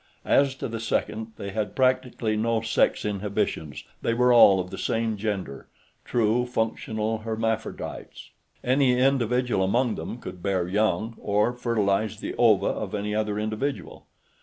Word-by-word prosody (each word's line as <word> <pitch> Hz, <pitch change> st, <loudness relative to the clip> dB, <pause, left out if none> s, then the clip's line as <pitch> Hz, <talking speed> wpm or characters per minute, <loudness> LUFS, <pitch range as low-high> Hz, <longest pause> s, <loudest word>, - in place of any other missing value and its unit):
As 140 Hz, -1 st, +3 dB
to -, -, -4 dB
the 115 Hz, -1 st, -5 dB
second, 110 Hz, 0 st, -2 dB
they 100 Hz, -, -5 dB
had 105 Hz, +1 st, -3 dB
practically 130 Hz, -4 st, +1 dB
no 115 Hz, +1 st, +1 dB
sex 110 Hz, -1 st, +1 dB
inhibitions; 100 Hz, -7 st, -2 dB, 0.2 s
they 115 Hz, -, 0 dB
were 125 Hz, +1 st, +4 dB
all 100 Hz, -5 st, +7 dB
of 90 Hz, 0 st, -4 dB
the -, -, -6 dB
same 115 Hz, -1 st, 0 dB
gender, 100 Hz, -10 st, -4 dB, 0.4 s
true, 120 Hz, +1 st, +1 dB
functional, 110 Hz, -1 st, -2 dB
hermaphrodites. 110 Hz, 0 st, -4 dB, 0.3 s
Any 130 Hz, 0 st, +3 dB
individual 125 Hz, -4 st, +2 dB
among 115 Hz, +5 st, +1 dB
them -, -, -6 dB
could 90 Hz, -6 st, -9 dB
bear 95 Hz, -2 st, 0 dB
young, 105 Hz, +2 st, 0 dB
or 105 Hz, +4 st, +1 dB
fertilize 110 Hz, -4 st, 0 dB
the -, -, -5 dB
ova -, -, +5 dB
of -, -, -2 dB
any 105 Hz, 0 st, -2 dB
other 105 Hz, -1 st, -1 dB
individual. 110 Hz, +6 st, -4 dB
110 Hz, 145 wpm, -25 LUFS, 105-120 Hz, 0.4 s, all